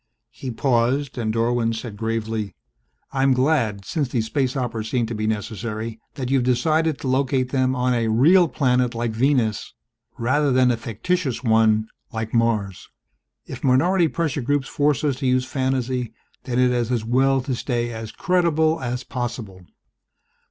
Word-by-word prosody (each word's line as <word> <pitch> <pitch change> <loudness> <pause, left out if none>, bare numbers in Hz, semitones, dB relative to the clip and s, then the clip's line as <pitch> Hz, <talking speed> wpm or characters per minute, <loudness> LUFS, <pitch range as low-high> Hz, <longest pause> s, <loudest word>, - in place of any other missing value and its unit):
He 130 +1 -7
paused 125 +2 0
and 110 -2 -1
Dorwin 115 0 +1
said 110 -1 -6
gravely, 110 -1 -3 0.6
"I'm 135 0 +3
glad, 125 -7 +1
since 150 -5 -1
these 115 -3 -1
space 130 +2 -1
operas 115 -4 -3
seem 120 -1 +1
to 115 - -5
be 110 0 -2
necessary, 110 +1 -4 0.2
that 130 -2 -4
you 135 - +4
have - - -1
decided 155 +5 +1
to - - -4
locate 130 0 +1
them 130 -1 +1
on 125 0 +1
a 115 -2 0
real 160 +11 +5
planet 125 -3 +1
like 115 0 -1
Venus 115 -2 0 0.4
rather 140 +5 +1
than 125 -1 +4
a - - +1
fictitious 130 - -2
one 110 -2 +3 0.2
like 110 -1 -4
Mars. 110 -5 0 0.6
If - - -9
minority 165 +7 +3
pressure 155 -3 -2
groups 140 +1 0
force 145 -1 +1
us 140 -4 0
to 135 -1 -2
use 125 0 +2
fantasy 130 -3 -2 0.3
then 125 -1 -2
it 125 0 +4
is 120 -1 0
as 115 -3 -1
well 135 +3 +3
to 130 +1 -3
stay 120 -1 -2
as 110 0 -6
credible 165 -3 +1
as 125 0 -3
possible." 115 -8 -6
125 Hz, 165 wpm, -22 LUFS, 115-135 Hz, 0.6 s, real